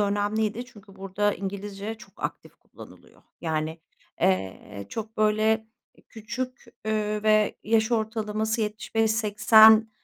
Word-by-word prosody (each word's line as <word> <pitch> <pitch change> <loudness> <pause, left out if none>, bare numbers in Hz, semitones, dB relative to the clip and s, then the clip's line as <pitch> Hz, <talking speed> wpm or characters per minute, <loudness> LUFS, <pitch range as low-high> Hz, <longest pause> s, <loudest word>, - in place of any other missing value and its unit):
önemliydi 210 +3 0
çünkü 205 -5 -17
burada 195 +2 -1
İngilizce 200 +2 -5
çok 220 - -16
aktif - - -6
kullanılıyor. - - -16 0.2
Yani, 160 0 -2 0.4
eee, 95 +1 -1
çok, 220 - -6
böyle, 215 +1 +2 0.4
küçük, 250 +4 -6 0.2
eee, 215 -1 -1
ve 215 -1 +3
yaş 220 +1 +2
ortalaması 220 0 -1
75-80 220 0 +4
215 Hz, 100 wpm, -26 LUFS, 205-220 Hz, 0.4 s, 75-80